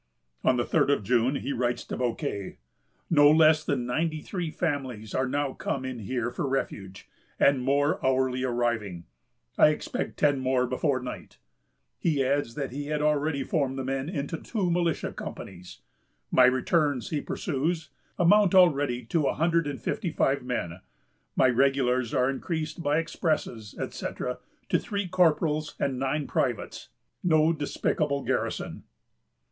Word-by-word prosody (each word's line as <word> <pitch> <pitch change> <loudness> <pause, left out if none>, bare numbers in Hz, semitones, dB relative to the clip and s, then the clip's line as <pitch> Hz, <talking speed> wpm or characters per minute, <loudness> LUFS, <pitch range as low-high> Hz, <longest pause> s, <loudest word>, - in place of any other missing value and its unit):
On 130 - +3
the 120 - 0
third - - +2
of 140 -7 +2
June, 125 +5 +2
he 140 - -3
writes 120 0 -1
to - - -5
Bouquet: 115 -5 -3 0.5
"No 145 -3 +7
less 155 0 +5
than 130 -5 -1
ninety 155 +5 -1
three 175 +1 -4
families 130 - -3
are 130 0 +1
now 140 0 -1
come 130 -1 -3
in 130 -2 -5
here 120 +2 -2
for 135 - -3
refuge, 95 -8 -4 0.3
and 140 -2 +4
more 140 +3 +1
hourly 130 -1 +1
arriving. 120 -8 -1 0.5
I - - +8
expect 150 - -2
ten 145 -2 +3
more 130 -1 +1
before 130 +1 0
night." 125 - -8 0.6
He 145 -5 +1
adds 135 -3 0
that 140 -4 -3
he 145 +2 -5
had 150 0 -1 0.5
formed 135 -4 0
the 135 - -2
men 135 +3 -2
into 155 -2 -3
two 195 -7 -2
militia 170 -2 0
companies. 90 -1 -9 0.5
"My 130 - +6
returns," 130 0 +1
he 150 -2 -1
pursues, 155 0 -2 0.3
"amount 195 +2 +5
already 145 -9 +4
to 150 +4 +1
a - - 0
hundred 165 0 +2
and 140 -2 -4
fifty 180 - -2
five 140 -3 +1
men. 90 -9 -3 0.6
My 130 - +5
regulars 130 -1 +2
are 125 - +2
increased 155 +4 -3
by 145 -1 +1
expresses, 150 -10 -2
etc., - - -4 0.3
to - - +3
three 200 -2 -3
corporals 160 -4 +1
and 130 -2 -1
nine 135 +2 -1
privates; 120 -5 -2 0.3
no 160 -1 +4
despicable 145 -1 -1
garrison!" - - -2
140 Hz, 150 wpm, -27 LUFS, 125-155 Hz, 0.6 s, I